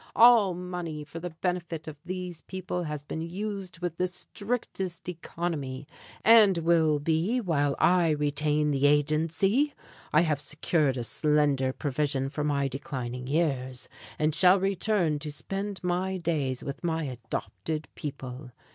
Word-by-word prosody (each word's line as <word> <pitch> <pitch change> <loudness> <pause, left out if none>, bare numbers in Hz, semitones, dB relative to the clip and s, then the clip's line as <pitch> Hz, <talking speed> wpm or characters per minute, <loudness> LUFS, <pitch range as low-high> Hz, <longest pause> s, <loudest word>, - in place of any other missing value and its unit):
"All 225 -6 +7
money 175 -4 -5
for 165 +3 -8
the 180 +1 -4
benefit 170 -1 -3
of 155 - -6
these 180 -2 -5
people 185 -1 -4
has 150 -2 -4
been 160 +2 -5
used 190 +2 -4
with 170 -2 -2
the 180 - +1
strictest 190 -2 -4
economy; 160 -6 -4 0.4
and 215 -5 +7
will 165 -2 +3
be 165 - +1
while 145 - +1
I 175 -2 +4
retain 150 0 +1
the 140 0 +3
agency. 160 - +2 0.4
I 155 - +5
have 150 -4 +1
secured 150 -1 +1
a 120 - -2
slender 145 -1 +2
provision 140 -1 -1
for 150 +1 -3
my 140 -2 +1
declining 130 -3 -5
years, 135 -5 -1 0.3
and 155 0 +1
shall 185 +3 +5
return 190 -4 +1
to 150 0 -5
spend 195 +5 -4
my 185 +1 0
days 150 -7 -1
with 140 +4 -6
my 165 -1 0
adopted 135 +4 -4
people. 130 -3 -7
160 Hz, 140 wpm, -28 LUFS, 145-180 Hz, 0.4 s, All